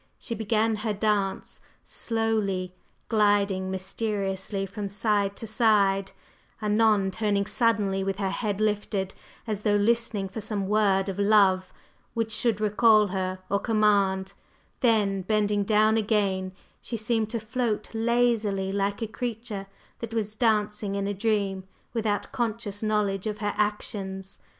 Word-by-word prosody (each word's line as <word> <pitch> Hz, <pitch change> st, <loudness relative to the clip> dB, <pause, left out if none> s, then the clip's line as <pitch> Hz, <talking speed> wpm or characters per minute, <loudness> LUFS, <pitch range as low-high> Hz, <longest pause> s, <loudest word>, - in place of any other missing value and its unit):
She -, -, -6 dB
began 220 Hz, 0 st, +1 dB
her 215 Hz, 0 st, -2 dB
dance 205 Hz, -2 st, -1 dB, 0.2 s
slowly, 215 Hz, -5 st, -1 dB, 0.3 s
gliding 205 Hz, -3 st, +2 dB
mysteriously 195 Hz, 0 st, -2 dB
from 200 Hz, +1 st, -5 dB
side 200 Hz, -1 st, +1 dB
to 225 Hz, -, -7 dB
side, 205 Hz, -3 st, +2 dB, 0.5 s
anon 210 Hz, -2 st, +3 dB
turning 200 Hz, 0 st, 0 dB
suddenly 205 Hz, -4 st, +1 dB
with 195 Hz, -1 st, -2 dB
her 195 Hz, -2 st, -1 dB
head 205 Hz, -1 st, -2 dB
lifted, 205 Hz, -2 st, -1 dB, 0.3 s
as 215 Hz, -3 st, -3 dB
though 210 Hz, -1 st, +2 dB
listening 220 Hz, -1 st, +1 dB
for 200 Hz, +4 st, -6 dB
some 200 Hz, -2 st, -2 dB
word 200 Hz, -2 st, +2 dB
of 195 Hz, 0 st, -4 dB
love 200 Hz, -3 st, +4 dB, 0.4 s
which 225 Hz, -1 st, -1 dB
should 220 Hz, 0 st, +1 dB
recall 215 Hz, 0 st, +4 dB
her 185 Hz, 0 st, -3 dB
or 200 Hz, -, +1 dB
command; 200 Hz, -4 st, +2 dB, 0.5 s
then, 210 Hz, -5 st, +2 dB
bending 205 Hz, +1 st, +1 dB
down 215 Hz, +1 st, +3 dB
again, 200 Hz, -4 st, 0 dB, 0.3 s
she 230 Hz, -, -4 dB
seemed 220 Hz, 0 st, 0 dB
to 230 Hz, 0 st, -2 dB
float 230 Hz, 0 st, -2 dB
lazily 225 Hz, -4 st, +1 dB
like 200 Hz, +2 st, -1 dB
a -, -, -2 dB
creature 225 Hz, -3 st, -5 dB, 0.3 s
that 230 Hz, -1 st, -6 dB
was 215 Hz, -2 st, -1 dB
dancing 210 Hz, -2 st, 0 dB
in 200 Hz, 0 st, -1 dB
a 205 Hz, -, -1 dB
dream 200 Hz, -2 st, 0 dB, 0.3 s
without 215 Hz, -3 st, -1 dB
conscious 220 Hz, -4 st, -2 dB
knowledge 210 Hz, -2 st, 0 dB
of 210 Hz, -1 st, -3 dB
her 205 Hz, 0 st, -2 dB
actions. 195 Hz, -2 st, -3 dB
210 Hz, 135 wpm, -26 LUFS, 195-220 Hz, 0.5 s, love